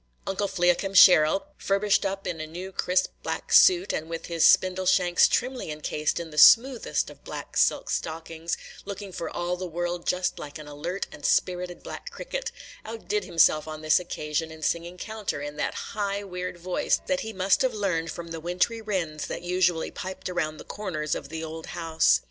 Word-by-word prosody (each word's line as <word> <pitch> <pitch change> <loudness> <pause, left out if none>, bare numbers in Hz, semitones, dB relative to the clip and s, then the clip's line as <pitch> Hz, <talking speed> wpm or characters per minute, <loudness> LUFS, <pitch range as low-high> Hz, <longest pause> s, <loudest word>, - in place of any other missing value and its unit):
Uncle 195 +1 -1
Fliakim 190 +1 +1
Sheril, 180 - +7 0.2
furbished 200 0 +2
up 195 0 -5
in 170 -4 -3
a 155 - -5
new 180 +4 -7
crisp 185 0 +1
black - - -4
suit, 370 0 +6
and 160 +1 -3
with 165 0 -5
his 165 -2 0
spindle 185 0 +4
shanks 175 -1 +4
trimly 255 -6 -1
incased 150 +1 -2
in 165 -2 -7
the 150 - -1
smoothest 245 - +5
of - - -17
black - - -8
silk - - +2
stockings, 165 +1 -3 0.3
looking 200 0 -7
for 170 - -5
all 175 +1 -2
the 185 0 -5
world 175 +1 -3
just 180 0 0
like 145 +1 -7
an 155 -1 -10
alert 165 +6 -4
and - - -12
spirited 180 -1 0
black - - -7
cricket, - - -5 0.3
outdid 425 -2 -3
himself 160 -2 +3
on 155 0 -7
this 155 +2 +4
occasion 160 -2 -3
in 160 0 -10
singing 170 +2 -1
counter, 215 -6 -4
in 145 +1 -6
that - - -2 0.2
high, 200 -1 -2
weird 180 -2 -5
voice 180 +1 0
that 275 -1 0
he 220 - -5
must 190 -1 +2
have 260 -3 +1
learned 175 -6 -1
from 170 -1 -7
the 165 0 -5
wintry 180 +7 -1
winds 175 -8 -3
that - - -5
usually 175 -2 +1
piped 190 +1 -6
around 155 -4 -2
the - - -9
corners 155 -8 -3
of 140 - -5
the 160 +1 -5
old 160 0 -7
house. 160 -1 +3
175 Hz, 190 wpm, -26 LUFS, 160-195 Hz, 0.3 s, Sheril